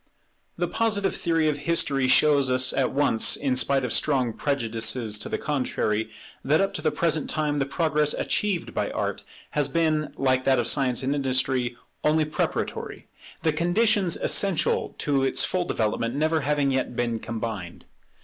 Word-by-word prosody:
The - - 0
Positive 205 -4 0
theory 165 -2 0
of 150 -1 -1
history 140 -5 +2
shows 140 0 +4
us 130 0 +2
at 135 -2 0
once, 135 -5 +2
in 135 -3 -1
spite 135 0 +2
of 125 - -1
strong 130 -6 +1
prejudices 115 -4 0
to - - -5
the - - -2
contrary, 110 -6 -1 0.3
that 150 +4 +2
up 195 0 0
to 155 - -4
the 155 - +2
present 155 0 -1
time 150 -2 -1
the 135 - -1
progress 150 0 +1
achieved 200 -4 -1
by - - -1
Art - - -3 0.3
has 150 -2 0
been, 155 -2 0
like 130 -1 +1
that 135 -1 +4
of 120 - 0
Science 130 0 +1
and 135 +2 0
Industry, 130 -3 -1 0.3
only 155 +1 +2
preparatory; 155 - -4 0.3
the 160 - +2
conditions 180 +3 +2
essential 195 -5 +1
to 140 -2 0
its 135 - +2
full 180 -1 -1
development 115 -1 -1
never 155 +2 +1
having 140 0 +1
yet 130 -2 -2
been 120 -2 -1
combined. 110 -6 -6
140 Hz, 165 wpm, -25 LUFS, 125-155 Hz, 0.3 s, shows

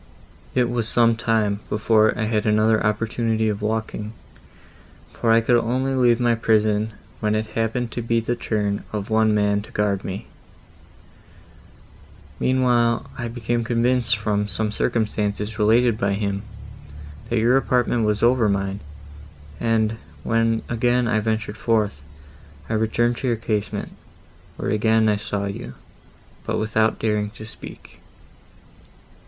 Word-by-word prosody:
"It 125 -2 +3
was 120 -2 -1
some 115 -1 +3
time, 110 -3 0
before 110 0 +3
I 110 - -1
had 110 -1 0
another 110 +1 +3
opportunity 110 +1 0
of 105 0 -3
walking, 110 0 -3 1.0
for 115 - +1
I 115 0 +5
could 120 +1 +3
only 130 +4 -1
leave 120 -2 +3
my 120 -1 +3
prison, 110 -1 +1 0.3
when 105 0 0
it 110 0 0
happened 115 +1 -1
to 120 - -4
be 115 0 +1
the 120 +2 -2
turn 105 -3 -2
of 105 0 -4
one 110 -1 +3
man 105 0 +2
to 105 - -14
guard 100 -2 0
me; 95 +1 -5 2.1
meanwhile 120 -2 +2
I 120 -2 -4
became 120 0 -2
convinced 120 0 +2
from 105 -1 -1
some 105 +2 -2
circumstances 105 -2 -1
related 115 +1 +3
by 100 0 +1
him, 100 -1 -2 0.9
that 120 - 0
your 115 +3 +4
apartment 125 -3 +1
was 105 0 0
over 120 -2 +4
mine, 100 0 -1 0.8
and, 115 -1 +1 0.2
when 115 0 +1
again 120 +1 +1
I 110 -2 +2
ventured 110 -1 -2
forth, 105 - 0 0.7
I - - -3
returned 115 +2 +1
to 130 - -3
your 120 -2 +1
casement, 110 -2 -3 0.7
where - - -2
again 110 +1 +3
I 105 -1 +2
saw 100 -1 -3
you, 100 - -6 0.7
but - - -2
without 110 +1 +1
daring 105 -2 0
to 110 - -8
speak. 110 - -12
110 Hz, 140 wpm, -22 LUFS, 105-115 Hz, 2.1 s, I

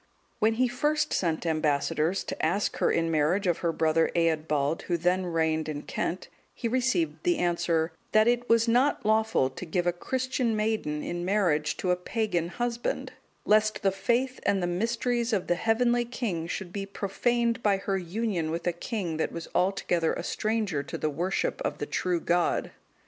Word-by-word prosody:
When 220 +1 +3
he 255 +2 +3
first 295 +5 0
sent 165 -2 0
ambassadors 155 +2 +1
to - - -5
ask 185 +6 +1
her - - +2
in 165 0 +1
marriage 160 +6 +2
of 175 -2 +1
her 170 - 0
brother 160 0 +2
Eadbald, 155 -2 +1
who 175 - +1
then 180 +2 +1
reigned 160 -2 0
in 145 -1 -4
Kent, 180 - -3 0.3
he 235 - -2
received 185 -11 0
the 175 0 +2
answer, 170 -2 +1 0.2
"That 215 +1 +5
it 240 0 +1
was 230 0 +4
not 250 +4 +2
lawful 220 -10 +2
to 130 - -8
give 175 +1 -1
a 175 - +2
Christian 255 +4 -1
maiden 215 -9 -1
in 175 0 -3
marriage 175 -6 +1
to 180 - 0
a - - +4
pagan 180 -2 -1
husband, 240 +5 -3 0.3
lest 215 0 +3
the 195 - +4
faith 240 +7 0
and 200 - +1
the 180 - 0
mysteries 235 +6 0
of 195 -4 +1
the - - +2
heavenly 240 +5 +2
King 220 -9 -3
should 175 +1 -5
be 195 -1 -4
profaned 230 +4 0
by 205 -3 +3
her 195 0 -1
union 185 -2 -2
with 165 +2 -3
a 175 - +1
king 175 -3 -3
that 160 - -1
was 170 - -6
altogether 180 -3 +1
a - - -4
stranger 215 -8 -1
to 140 - -6
the 155 - -1
worship 185 - -1
of - - -2
the - - -3
true 180 -2 -1
God." 175 +1 +1
185 Hz, 180 wpm, -28 LUFS, 165-225 Hz, 0.3 s, That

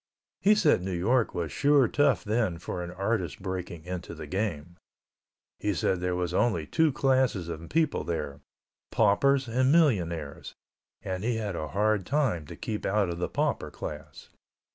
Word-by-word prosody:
He 210 +2 +5
said 155 - +3
New 90 -1 -3
York 115 +6 +1
was 85 -4 -2
sure 140 - +4
tough 140 -2 +2
then 105 -5 0
for 90 +1 -5
an 85 - -6
artist 95 -2 -2
breaking 90 -4 -5
into 90 -1 -6
the 80 -1 -7
game. 90 -2 -3 0.8
He 105 -2 -1
said 90 +3 0
there 90 0 -1
was 90 -1 -2
only 90 -6 +1
two 160 - +2
classes 130 - +1
of 85 0 -7
people 160 - +1
there: 75 -4 -4 0.5
paupers 130 +6 +3
and 130 +3 +2
millionaires, 85 - +1 0.5
and 95 +1 -3
he 120 +1 0
had 105 -4 -3
a 80 - -3
hard 105 +3 +1
time 125 - 0
to - - -8
keep 110 -1 -4
out 100 -1 +1
of 85 0 -4
the - - -1
pauper - - -1
class. - - -8
95 Hz, 165 wpm, -28 LUFS, 85-125 Hz, 0.8 s, He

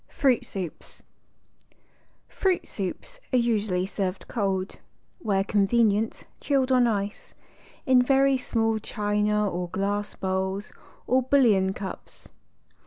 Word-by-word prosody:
FRUIT 260 -4 +2
SOUPS 185 -5 -8 1.2
Fruit 375 -2 0
Soups 205 - -6
are 255 - +3
usually 210 -6 +1
served 190 -1 -3
cold 195 -4 -1
â - - -17 0.4
where 195 - +1
convenient 215 +1 +1 0.2
chilled 270 -2 +1
on 250 -2 +5
ice 205 -2 -3
â - - -32 0.3
in 260 -3 +5
very 270 +1 +3
small 225 -3 0
china 210 0 0
or 180 -1 -3
glass 205 +3 -2
bowls 190 +1 -2 0.3
or 260 +1 +3
bouillon 235 -8 +3
cups. 195 -2 -8
210 Hz, 115 wpm, -26 LUFS, 195-250 Hz, 1.2 s, on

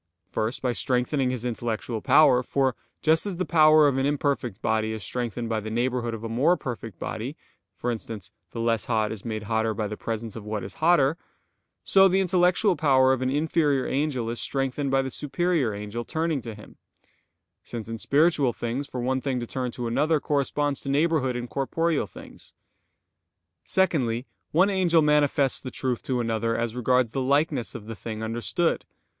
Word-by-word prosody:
First, 110 +4 -2
by 125 -2 +1
strengthening 125 +2 0
his 125 -2 -3
intellectual 115 -1 -3
power; 135 -3 +5
for 130 0 0 0.3
just 160 +5 +3
as 190 -4 -4
the 185 - -1
power 155 -2 +6
of 135 -2 +1
an 135 - +1
imperfect 140 -7 -1
body 110 -1 0
is 110 -2 -6
strengthened 120 +1 -3
by 110 -1 -1
the 110 +1 -6
neighborhood 120 0 -1
of 110 - -9
a - - -3
more 140 +11 +2
perfect 115 - -6
body - - -5 0.4
for 120 - -2
instance, 110 -3 -7 0.2
the 115 - -7
less 115 -1 0
hot 110 -3 0
is 110 -3 -7
made 110 -2 -4
hotter 110 0 0
by 110 - -2
the 105 +1 -4
presence 115 0 -5
of 110 - -7
what 105 -1 -4
is 95 0 -9
hotter; 160 -2 +4 0.7
so 195 0 +6
the 190 +1 +2
intellectual 180 +1 +3
power 130 -4 +4
of 130 - -2
an 130 - +1
inferior 145 -1 +1
angel 135 -4 -1
is 120 -1 -4
strengthened 135 +1 -1
by 135 0 +2
the 130 - -4
superior 150 -3 0
angel 105 +3 -5
turning 160 0 -1
to 115 -3 -7
him: 105 - -14 0.9
since 115 -3 -7
in 115 0 -5
spiritual 145 -3 +3
things, 125 +4 -3
for 125 -3 -5
one 130 +2 0
thing 130 -2 -1
to 120 - -4
turn 125 +1 -3
to 120 0 -5
another, 150 +7 +2
corresponds 145 0 -1
to 135 - -5
neighborhood 140 -3 +1
in 120 0 -4
corporeal 150 +1 0
things. 85 - -13 1.1
Secondly, 130 -10 +1 0.3
one 185 +6 +4
angel 175 -4 +3
manifests 145 -2 +3
the 130 - -6
truth 125 -2 -2
to 130 -2 -2
another 115 0 0
as 115 0 -2
regards 125 -1 +2
the 135 - -2
likeness 140 -1 +1
of 110 -3 -7
the 115 +1 -6
thing 110 +3 -6
understood. 120 +10 0
130 Hz, 185 wpm, -26 LUFS, 115-150 Hz, 1.1 s, power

